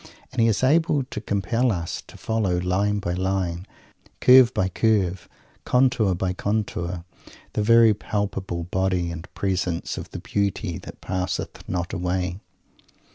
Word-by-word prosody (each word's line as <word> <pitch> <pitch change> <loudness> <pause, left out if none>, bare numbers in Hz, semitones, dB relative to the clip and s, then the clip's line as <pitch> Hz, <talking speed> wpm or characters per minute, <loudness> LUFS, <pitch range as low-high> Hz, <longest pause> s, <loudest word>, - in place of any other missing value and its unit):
And 130 - 0
he 115 - +5
is 110 +1 +1
able 150 0 +3
to 125 - -7
compel 115 +4 0
us 85 -4 -3
to - - -13
follow, 110 -5 0
line 95 +3 +1
by 100 -3 -2
line, 95 -1 -1 0.5
curve 125 -1 +7
by 95 - +1
curve, 95 -4 +1 0.3
contour 125 -7 +3
by 90 +1 -1
contour, 95 -4 -2 0.5
the - - 0
very 115 0 +6
palpable 95 -4 -3
body 90 -1 0
and 85 +1 -8
presence 90 -3 -1
of - - -8
the - - -7
Beauty 100 -5 -2
that - - -11
passeth 90 0 -4
not 90 -1 -2
away. 90 0 -2
95 Hz, 140 wpm, -24 LUFS, 90-110 Hz, 0.5 s, curve